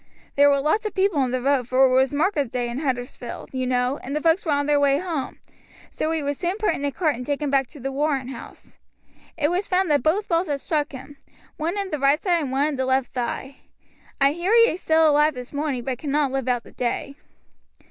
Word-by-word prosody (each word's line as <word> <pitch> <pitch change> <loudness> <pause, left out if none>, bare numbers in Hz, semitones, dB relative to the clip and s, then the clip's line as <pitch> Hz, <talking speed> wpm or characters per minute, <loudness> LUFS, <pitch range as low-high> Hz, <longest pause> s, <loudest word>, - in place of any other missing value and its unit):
There 285 0 +6
were 280 -1 +3
lots 365 +10 +1
of 420 - -8
people 380 -7 +2
in 255 - -1
the 250 0 -2
road, 270 -3 +1
for 255 +2 +4
it 255 - +2
was 265 +1 +3
market 295 - 0
day 245 -1 -1
in 240 +3 -4
Huddersfield, 245 -4 -4
you 255 -1 -2
know, 250 +2 0
and 275 +3 -5
the 300 - -1
folks 330 +3 +3
were 320 - -1
on 285 0 +1
their 295 0 +3
way 280 -1 +3
home, 325 -5 -4 0.5
so 310 - -2
he 320 -2 -1
was 285 0 -2
soon 355 +2 -1
put 430 -6 +1
in 285 - -5
a 285 - 0
cart 310 -2 0
and 250 - -6
taken 285 +1 -2
back 270 -2 +2
to 295 - -13
the 270 +2 -4
Warren 275 -2 -1
House. 265 - -11 0.6
It 295 -2 +1
was 360 +3 -1
found 370 -2 +1
that 290 - +3
both 360 - +1
balls 340 +1 +1
had 285 -2 -2
struck 300 +1 -1
him, 270 +1 -10 0.4
one 335 +6 -2
in 395 -2 -3
the 300 - -2
right 280 +2 +3
side 350 -3 +1
and 275 -4 -3
one 275 +2 +2
in 290 - -4
the 260 - 0
left 260 -1 0
thigh. 260 +2 -4 0.6
I 275 0 +4
hear 345 +7 -1
he 465 0 +6
is 355 - -6
still 320 0 +4
alive 300 0 +3
this 250 +2 -8
morning, 285 -4 -2
but 255 -1 -3
cannot 290 -2 0
live 270 -1 -2
out 245 -2 0
the - - -15
day." 250 +3 -3
285 Hz, 250 wpm, -23 LUFS, 265-320 Hz, 0.6 s, There